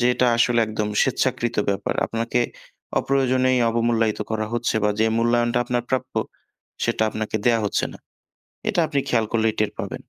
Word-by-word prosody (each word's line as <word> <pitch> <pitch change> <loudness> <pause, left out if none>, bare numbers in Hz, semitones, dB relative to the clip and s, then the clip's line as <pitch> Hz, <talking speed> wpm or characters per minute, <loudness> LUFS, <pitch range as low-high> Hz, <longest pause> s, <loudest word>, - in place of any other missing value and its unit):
যে, 120 - +3
এটা 125 - +2
আসলে 120 0 +3
একদম 110 -1 -2
স্বেচ্ছাকৃত 125 -2 0
ব্যাপার। 100 - -2
আপনাকে 115 +2 -1 0.6
অপ্রয়োজনেই 130 -1 +2
অবমূল্যায়িত 115 -2 +1
করা 110 -1 -1
হচ্ছে 120 0 0
বা 105 - +3
যে 110 - +4
মূল্যায়নটা 120 +1 +2
আপনার 120 0 -1
প্রাপ্য, 130 0 -2 0.7
সেটা - - 0
আপনাকে 110 0 -3
দেয়া 115 -2 +4
হচ্ছে 100 - 0
না। - - -12 0.7
এটা 200 -5 +1
আপনি 145 -3 0
খেয়াল 115 -2 +2
করলেই 110 -1 +2
টের 105 - 0
পাবেন। - - -4
120 Hz, 160 wpm, -23 LUFS, 110-125 Hz, 0.7 s, যে